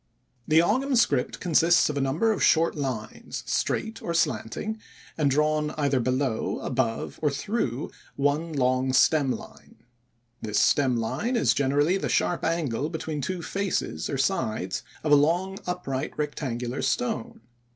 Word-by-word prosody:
The 160 +1 +5
Ogam 260 +8 +1
script 235 - +1
consists 170 0 +4
of 150 - -3
a 140 - 0
number 150 +12 +1
of 210 - -2
short 165 +1 +4
lines 130 -7 -5
straight 225 0 -1
or 170 - -3
slanting, 155 - -1 0.4
and 150 -3 +2
drawn 150 +2 +1
either 140 -3 +1
below, 130 -1 -1
above, 115 -4 -2
or 150 - +3
through 140 - -2 0.2
one 145 +4 0
long 130 -2 +1
stem 140 +1 +4
line. - - -9 0.7
This 105 -1 0
stem 130 -4 +3
line 210 - -1
is 235 - +3
generally 145 +6 +2
the - - -3
sharp 175 - +1
angle 155 -4 -1
between 160 -2 -4
two 175 +5 -3
faces 195 +2 -2
or 140 - -2
sides 110 - -1 0.2
of 155 - 0
a - - +9
long 175 +7 +1
upright 150 -6 -3
rectangular 130 -4 -3
stone. 125 -2 -2
145 Hz, 145 wpm, -26 LUFS, 130-170 Hz, 0.7 s, a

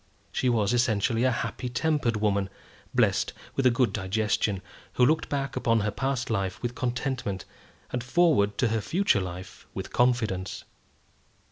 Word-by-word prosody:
She 130 - +1
was 110 -3 +2
essentially 120 0 +2
a 130 - +4
happy 125 +1 -3
tempered 135 -2 +1
woman, 100 -2 +1 0.4
blessed - - +2 0.2
with 135 -2 +3
a - - +7
good 120 -3 +2
digestion, 100 0 0 0.3
who 125 - +4
looked 155 +4 +2
back 140 -1 -2
upon 115 -1 +2
her 105 +1 0
past 135 -2 -2
life 95 -3 -1
with 120 0 -1
contentment, 120 -5 -2 0.5
and 125 -1 -2
forward 130 -8 +3
to 120 - +2
her 110 0 0
future 175 - +2
life 90 0 -8
with - - -6
confidence. 115 -7 +1
120 Hz, 150 wpm, -27 LUFS, 100-130 Hz, 0.5 s, a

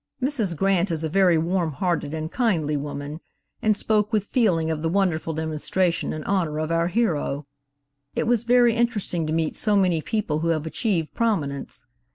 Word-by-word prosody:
Mrs. 245 - 0
Grant 195 0 +2
is 165 -2 -2
a 160 - -1
very 180 0 +4
warm 170 0 0
hearted 170 -3 -1
and 160 +1 -4
kindly 170 - +1
woman, 145 +1 -5 0.4
and 215 -3 +2
spoke 210 0 +1
with 215 -3 +1
feeling 185 -9 +1
of 155 -1 -3
the 165 - 0
wonderful 175 -3 0
demonstration 160 +3 -1
in 155 - -5
honor 170 -6 0
of 155 +1 -2
our 165 0 +2
hero. 170 -8 0 0.7
It - - 0
was 235 -1 +2
very 240 0 +4
interesting 210 -9 0
to - - -2
meet 160 -1 0
so 210 -2 +2
many 180 -4 +2
people 180 -6 -1
who 165 - -1
have 160 -2 0
achieved 165 -1 -1
prominence. 155 -12 -2
170 Hz, 180 wpm, -24 LUFS, 155-210 Hz, 0.7 s, very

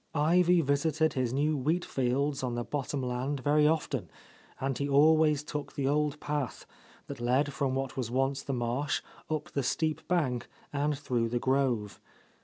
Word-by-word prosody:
Ivy 175 +3 +4
visited 155 +2 +1
his 130 -3 0
new 150 +4 +1
wheat 155 +6 0
fields 135 +2 0
on 125 -2 -2
the 120 - -2
bottom 140 0 -3
land 130 +3 -2
very 150 +2 +4
often; 160 0 -1 0.5
and 135 0 -1
he 140 +2 -2
always 150 +1 +5
took 150 -1 -5
the 135 -1 -1
old 150 +1 +1
path, 145 -4 -3 0.4
that - - -8
led 135 +4 +1
from 135 -1 0
what 135 -1 -3
was 125 -4 -2
once 135 +2 0
the 140 - -4
marsh, 125 +3 -1 0.3
up 155 -1 -3
the 140 - 0
steep 155 +4 -1
bank 140 -9 0 0.2
and 145 0 0
through 120 -5 -1
the 120 - 0
grove. 125 -5 0
140 Hz, 170 wpm, -30 LUFS, 130-150 Hz, 0.5 s, always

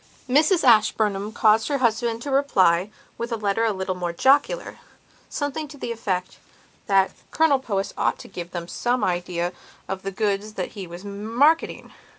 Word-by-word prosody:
Mrs 310 +7 +3
Ashburnham 215 -3 +3
caused 220 +1 +3
her 285 - 0
husband 235 -1 0
to 285 - -4
reply, 195 -10 +3 0.3
with 235 +1 -4
a - - +1
letter 210 0 0
a 225 - +2
little 190 -1 -2
more 180 -1 -3
jocularsomething 290 - -1
to 290 - -11
the 240 - -4
effect 190 -5 -3 0.5
that 195 -2 +3 0.2
Colonel 315 -4 +3
Powys 200 -6 -3
ought - - 0
to - - -11
give 175 -3 -7
them 170 -1 -6
some 245 +4 -1
idea 175 -1 -1 0.3
of 190 -1 -4
the 195 - -4
goods 205 +1 -2
that 185 -3 -4
he 195 -3 -8
was 175 +3 -10
marketing. 230 +11 +1
215 Hz, 165 wpm, -24 LUFS, 190-255 Hz, 0.5 s, Mrs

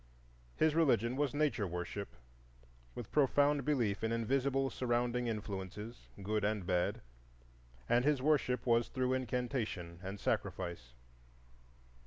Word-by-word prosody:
His 155 -1 +3
religion 125 -7 +3
was 145 -1 0
nature 130 -9 +1
worship, 90 +3 -5 0.8
with 120 - -7
profound 145 0 +3
belief 120 -9 0
in 110 - +1
invisible 135 +4 +1
surrounding 120 0 0
influences, 105 +1 -5 0.2
good 105 +1 0
and 105 -2 0
bad, 90 -1 0 0.9
and 120 +1 +3
his 145 -1 +3
worship 135 -3 +2
was 120 -1 +3
through 130 -1 0
incantation 120 -9 -2
and 95 +2 -6
sacrifice. 85 -14 -2
120 Hz, 115 wpm, -35 LUFS, 100-135 Hz, 0.9 s, His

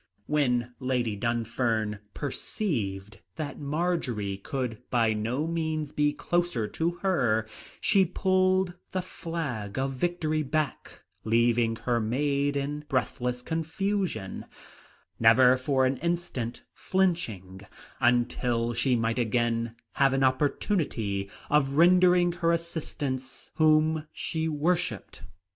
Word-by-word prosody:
When 125 -5 +1
Lady 125 -4 0
Dunfern 115 -1 -1 0.2
perceived 110 - -3 0.2
that 145 -2 -5
Marjory 140 - -1
could 120 +2 -4
by 115 -3 +2
no 115 +8 -1
means 160 -2 -2
be 150 0 +2
closer 175 -8 -1
to 165 +8 0
her, 120 - +2 0.3
she 195 -2 +4
pulled 185 0 +2 0.2
the 185 -1 -1
flag 140 - -5
of 135 +1 0
victory 155 +1 0
back, 155 +1 -3 0.2
leaving 115 0 +2
her 120 +1 0
maid 140 +5 0
in 145 +2 -3
breathless 125 -1 -1
confusion, 165 - -2 0.7
never 125 +3 +6
for 130 +1 +1
an 130 +1 +1
instant 155 -9 -3
flinching 115 - -1 0.4
until 120 -1 +1
she 125 +2 +2
might 115 +1 0
again 115 0 0 0.2
have 135 -1 +3
an 135 0 +2
opportunity 130 - 0 0.2
of 140 -2 +2
rendering 180 +2 +5
her 170 -1 +1
assistance 145 -6 -4
whom 155 0 +3
she 160 0 -2
worshipped. 160 +4 -1
135 Hz, 110 wpm, -28 LUFS, 115-165 Hz, 0.7 s, never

